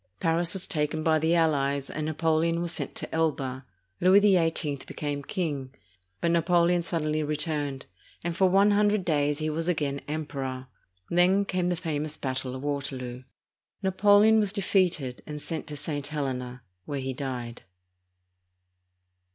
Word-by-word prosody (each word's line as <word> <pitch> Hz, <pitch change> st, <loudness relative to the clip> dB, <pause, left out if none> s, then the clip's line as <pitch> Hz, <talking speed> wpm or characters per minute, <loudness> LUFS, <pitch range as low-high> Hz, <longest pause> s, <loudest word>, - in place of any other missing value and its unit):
Paris 165 Hz, +1 st, +1 dB
was 190 Hz, -1 st, +2 dB
taken 155 Hz, 0 st, -1 dB
by 155 Hz, -1 st, +3 dB
the 160 Hz, +2 st, +2 dB
allies, 140 Hz, -4 st, +1 dB
and 155 Hz, 0 st, -4 dB
Napoleon 160 Hz, +1 st, +1 dB
was 170 Hz, -1 st, 0 dB
sent -, -, -4 dB
to -, -, -6 dB
Elba. 135 Hz, -5 st, -1 dB, 0.3 s
Louis 185 Hz, +3 st, +6 dB
XVIII 165 Hz, -7 st, +2 dB
became 145 Hz, -1 st, -4 dB
king; 140 Hz, -4 st, -3 dB, 0.5 s
but 170 Hz, -, +2 dB
Napoleon 170 Hz, +1 st, +3 dB
suddenly 155 Hz, -2 st, -1 dB
returned, 150 Hz, -2 st, -2 dB, 0.4 s
and 170 Hz, 0 st, -2 dB
for 190 Hz, +1 st, +4 dB
one 200 Hz, +3 st, +5 dB
hundred 205 Hz, -1 st, +2 dB
days 145 Hz, -3 st, +1 dB
he 155 Hz, 0 st, -2 dB
was 165 Hz, +2 st, -3 dB
again 145 Hz, -5 st, -1 dB
Emperor. 135 Hz, -4 st, -4 dB, 0.5 s
Then 185 Hz, +3 st, +4 dB
came 180 Hz, -2 st, -1 dB
the 180 Hz, -, +1 dB
famous 155 Hz, -3 st, -3 dB
battle 130 Hz, -1 st, -3 dB
of 130 Hz, -, -7 dB
Waterloo. 130 Hz, -3 st, -4 dB, 0.6 s
Napoleon 205 Hz, +3 st, +5 dB
was 205 Hz, -2 st, +2 dB
defeated 180 Hz, -, 0 dB
and 150 Hz, -1 st, -5 dB
sent 160 Hz, +2 st, -4 dB
to 150 Hz, -1 st, -6 dB
St, 145 Hz, -1 st, -3 dB
Helena, 130 Hz, -4 st, -4 dB, 0.2 s
where 145 Hz, -1 st, -3 dB
he 130 Hz, 0 st, -3 dB
died. 125 Hz, -3 st, -5 dB
155 Hz, 145 wpm, -27 LUFS, 140-175 Hz, 0.6 s, Louis